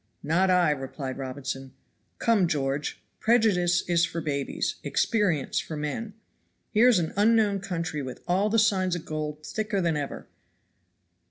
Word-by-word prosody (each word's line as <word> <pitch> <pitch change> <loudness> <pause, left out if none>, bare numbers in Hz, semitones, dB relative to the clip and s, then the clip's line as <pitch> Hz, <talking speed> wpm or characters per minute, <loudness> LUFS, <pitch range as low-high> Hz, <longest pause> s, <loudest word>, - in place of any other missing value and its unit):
"Not 170 +6 +2
I," 180 -4 +4
replied 135 -1 -5
Robinson. 135 0 -5 0.4
"Come, 220 -6 +3
George, 140 -2 -2 0.2
prejudice 195 -7 +3
is 170 -1 +3
for 170 0 -1
babies, 140 -4 -2
experience 190 - +1
for 155 - -5
men. 205 +9 -4 0.6
Here 225 +3 +5
is 245 -5 +6
an 165 -2 -1
unknown 210 -1 +3
country 170 -5 -3
with 130 -2 -7
all 190 +4 +2
the 225 - +2
signs 190 -5 +2
of 170 - -6
gold 155 -1 -4
thicker 210 +1 -2
than 170 -3 +1
ever. 145 -2 -4
175 Hz, 145 wpm, -27 LUFS, 150-205 Hz, 0.6 s, is